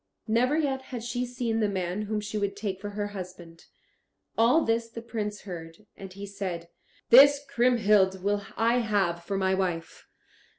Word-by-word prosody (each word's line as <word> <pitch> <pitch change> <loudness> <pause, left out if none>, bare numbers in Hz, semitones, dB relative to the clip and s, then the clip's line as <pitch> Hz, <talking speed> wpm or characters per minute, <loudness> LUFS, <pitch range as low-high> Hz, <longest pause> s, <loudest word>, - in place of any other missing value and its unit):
Never 250 +7 +2
yet 275 -4 0
had 245 -3 -5
she 245 +1 -2
seen 240 -2 -2
the 210 -2 +2
man 185 0 -2
whom 210 0 -2
she 210 +1 -6
would 200 -1 -1
take 200 -2 -4
for 205 - -4
her 205 0 -3
husband. 180 -4 -9 0.7
All 245 +8 +4
this 230 0 0
the 230 - -8
Prince 210 -3 -4
heard, 170 0 -9
and 195 -1 -10
he 200 +2 -8
said, 185 -4 -5 0.4
"This 285 +3 +8
Kriemhild 215 -8 +3
will 205 0 0
I 230 +2 +3
have 195 -7 0
for 195 +2 -3
my 190 0 +1
wife." 180 -4 -3
205 Hz, 170 wpm, -27 LUFS, 190-235 Hz, 0.7 s, This